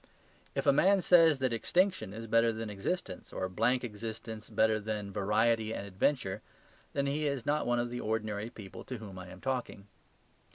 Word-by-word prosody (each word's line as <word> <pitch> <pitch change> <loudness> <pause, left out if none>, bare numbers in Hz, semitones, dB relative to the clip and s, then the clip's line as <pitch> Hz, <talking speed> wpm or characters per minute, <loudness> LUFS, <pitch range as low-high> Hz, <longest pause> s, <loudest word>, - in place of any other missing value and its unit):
If - - -1
a 140 - +6
man 195 +7 +5
says 165 -4 +6
that 130 -2 0
extinction 180 - +1
is 110 +3 -7
better 115 +1 +4
than 110 -1 -5
existence 100 - -4
or 95 - -2
blank 115 +7 +1
existence 110 0 -6
better 110 0 +3
than 105 -2 -4
variety 110 +2 +2
and 100 - -5
adventure, 100 +1 0 0.5
then 140 -1 0
he 150 +2 0
is 140 -4 -2
not 150 -1 +1
one 120 0 +2
of 120 0 -1
the 125 - -4
ordinary 110 0 -2
people 100 -5 -10
to 130 - -5
whom 100 -4 -9
I 90 - -8
am 90 +1 -11
talking. 125 -6 -3
115 Hz, 180 wpm, -32 LUFS, 105-130 Hz, 0.5 s, a